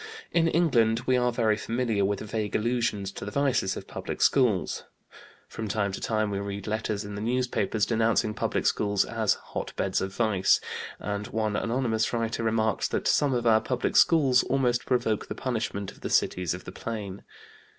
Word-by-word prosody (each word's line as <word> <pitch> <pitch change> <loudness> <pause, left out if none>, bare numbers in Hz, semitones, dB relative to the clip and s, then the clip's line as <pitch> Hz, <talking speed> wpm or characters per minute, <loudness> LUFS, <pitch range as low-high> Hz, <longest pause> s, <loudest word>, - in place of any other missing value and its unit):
In 165 -1 +3
England 120 -10 +3
we 130 - +3
are 125 0 +2
very 115 -3 +2
familiar 115 -1 -1
with 100 +1 0
vague 110 -1 -3
allusions 110 -4 0
to - - -8
the 105 - -4
vices 130 -5 +1
of - - -7
public - - -6
schools. 120 -9 +2 0.6
From 110 - -5
time 100 -1 0
to - - -6
time 110 -2 0
we 100 - -2
read 100 0 -5
letters 110 -1 -2
in 105 - -7
the 100 - -5
newspapers 120 -2 0
denouncing 115 -1 +1
public - - -1
schools 100 -1 +2
as - - +1
"hot - - -7
beds - - 0
of 95 - -3
vice" 100 -3 +2 0.4
and 100 0 -3
one 110 -2 -1
anonymous 115 -1 0
writer 115 0 -1
remarks 110 -1 +1
that - - -2
"some 140 -3 +3
of 120 - -1
our 110 -1 +5
public 125 +2 -2
schools 135 -7 +5
almost 125 -3 0
provoke 120 -4 0
the - - -5
punishment 110 -5 -3
of - - -19
the - - -4
cities 90 -1 +1
of 90 - -10
the - - -7
Plain." 100 -2 -6
110 Hz, 180 wpm, -27 LUFS, 105-120 Hz, 0.6 s, our